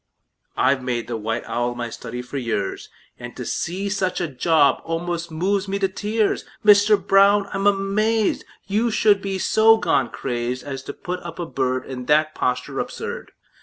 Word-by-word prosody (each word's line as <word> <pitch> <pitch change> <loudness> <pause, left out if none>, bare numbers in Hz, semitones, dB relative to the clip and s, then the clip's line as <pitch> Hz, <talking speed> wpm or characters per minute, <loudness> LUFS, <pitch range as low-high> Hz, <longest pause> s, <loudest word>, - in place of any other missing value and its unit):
I've 135 -1 +2
made 125 -2 -2
the 120 - -3
white 115 +1 -3
owl 120 0 -2
my 120 -1 -4
study 125 +2 -6
for 135 +3 -5
years, 115 -6 -3 0.3
And - - -8
to - - -5
see 190 +4 -2
such 195 -2 -1
a 175 - -1
job 145 0 +2
almost 170 +1 -3
moves 190 +5 -1
me 195 +1 -1
to 195 -1 +1
tears! 210 +3 -1 0.2
Mister 210 0 +6
Brown, 200 +1 +4
I'm 195 +1 +1
amazed 205 +2 +1 0.2
You 215 +4 +1
should 210 -2 +3
be 195 -1 -3
so 220 +4 +5
gone 160 - +1
crazed 125 0 -3
As 135 -2 -6
to - - -5
put 180 0 -5
up 170 -2 -9
a 175 - -3
bird 130 -3 -1
In 125 -2 -7
that 155 +1 +3
posture 125 0 -2
absurd! - - -5
170 Hz, 175 wpm, -22 LUFS, 130-200 Hz, 0.3 s, Mister